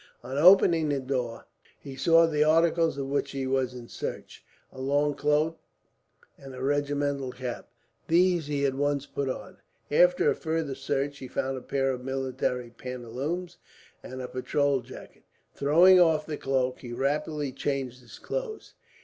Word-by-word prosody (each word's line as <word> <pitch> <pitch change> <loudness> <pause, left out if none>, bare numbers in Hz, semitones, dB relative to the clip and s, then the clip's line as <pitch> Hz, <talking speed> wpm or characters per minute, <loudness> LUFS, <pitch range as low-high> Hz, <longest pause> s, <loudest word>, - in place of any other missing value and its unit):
On 130 +2 -6
opening 165 -1 +6
the 140 -1 0
door, 130 -3 -3 0.3
he 135 -1 -9
saw 165 +4 +5
the 150 -2 +2
articles 165 0 +3
of 140 - -3
which 140 +1 -1
he 135 -1 -3
was 130 -1 0
in 120 -1 -9
search - - -7 0.3
a 130 - -9
long 145 +2 +1
cloak 150 +3 +1 0.8
and 135 -1 -10
a 130 - -6
regimental 145 -1 -1
cap. 125 -1 -6 0.4
These 175 -2 +3
he 145 -1 0
at 135 - +1
once 145 0 -1
put 140 -1 -3
on. - - -6 0.3
After - - +4
a - - -1
further 160 -3 -2
search, 140 +1 -2
he 130 - -7
found 135 +1 -2
a 130 - -6
pair 135 +1 0
of 125 -1 -5
military 130 -2 -2
pantaloons 125 +9 -5 0.4
and 130 0 -7
a - - -4
patrol 140 +2 0
jacket. 125 +2 -13 0.3
Throwing 175 +6 +6
off 160 -3 +4
the 155 - -4
cloak, 130 -2 -1
he 120 -2 -8
rapidly 145 +2 -1
changed 135 -2 -3
his 120 - -13
clothes. - - -5
140 Hz, 160 wpm, -27 LUFS, 130-155 Hz, 0.8 s, opening